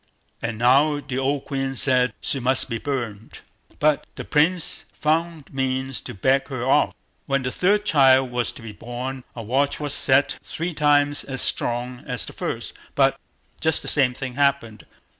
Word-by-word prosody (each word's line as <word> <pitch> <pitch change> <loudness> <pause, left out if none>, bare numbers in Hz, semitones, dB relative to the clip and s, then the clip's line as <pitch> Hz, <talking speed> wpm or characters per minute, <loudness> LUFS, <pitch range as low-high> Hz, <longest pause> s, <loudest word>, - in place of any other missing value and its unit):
And 115 -2 -3
now 140 +6 +4
the 130 -3 -4
old 135 +1 -1
queen 135 -1 -3
said 125 -3 +4
she 135 - -1
must 130 0 +2
be 115 - -2
burnt, 115 -6 -5 0.4
but 150 -1 +2
the - - -7
Prince 160 +3 +1
found 160 -1 -1
means 130 -1 -2
to - - -8
beg 130 +7 +2
her 130 -3 -4
off. 135 +3 +4
But - - -23 0.3
when 140 -2 0
the 125 - -2
third 205 +8 +1
child 135 -6 +4
was 120 -1 -1
to - - -12
be 110 - -7
born, 125 +4 -6
a 115 - -6
watch 135 +6 0
was 145 -2 -2
set 135 +1 +2
three 170 +2 -4
times 145 -1 +2
as 130 -5 -2
strong 125 +2 -1
as 125 -2 -2
the - - -10
first, - - -4 0.2
but - - +3 0.4
just 160 -1 +2
the - - -7
same 130 -4 +2
thing 130 -1 -5
happened. 140 -5 0
135 Hz, 180 wpm, -23 LUFS, 125-145 Hz, 0.4 s, now